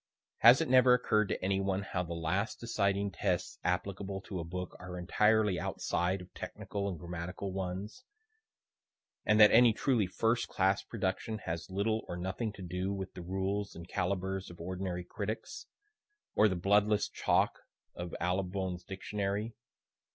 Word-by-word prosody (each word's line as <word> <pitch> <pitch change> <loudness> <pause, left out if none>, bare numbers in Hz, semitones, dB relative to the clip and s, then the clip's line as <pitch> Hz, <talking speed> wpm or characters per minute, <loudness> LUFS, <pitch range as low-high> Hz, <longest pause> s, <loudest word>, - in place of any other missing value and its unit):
(Has 120 +6 +8
it 165 - 0
never 125 -1 +7
occur'd 110 -4 +2
to - - -2
any 95 0 +2
one 95 0 0
how 90 -2 -2
the 85 -1 -4
last 90 +6 -1
deciding 100 -3 0
tests 85 - -1
applicable 95 +2 -2
to 95 -1 -6
a - - -3
book 90 +2 -5
are 90 0 -7
entirely 105 +2 +3
outside 90 +2 -1
of 90 - -13
technical 100 -1 -4
and 90 - -4
grammatical 90 +4 -5
ones, 95 - -4 1.2
and 105 0 +4
that 105 -1 +9
any 120 0 +7
truly 115 -4 +1
first 115 +5 +1
class 95 0 +2
production 110 +1 -2
has 85 0 -4
little 105 +4 0
or 85 - -4
nothing 95 +5 -2
to 100 - -9
do 90 +2 -2
with 95 -1 -4
the 90 - -8
rules 95 +3 -2
and 85 +1 -9
calibres 95 +1 -2
of 85 - -12
ordinary 90 +1 -3
critics? 110 - -5 0.7
or 110 - +5
the 95 - 0
bloodless 105 +3 +3
chalk - - +1 0.3
of 85 0 -6
Allibone's 90 0 -1
Dictionary? 100 +3 -3
95 Hz, 155 wpm, -32 LUFS, 90-105 Hz, 1.2 s, that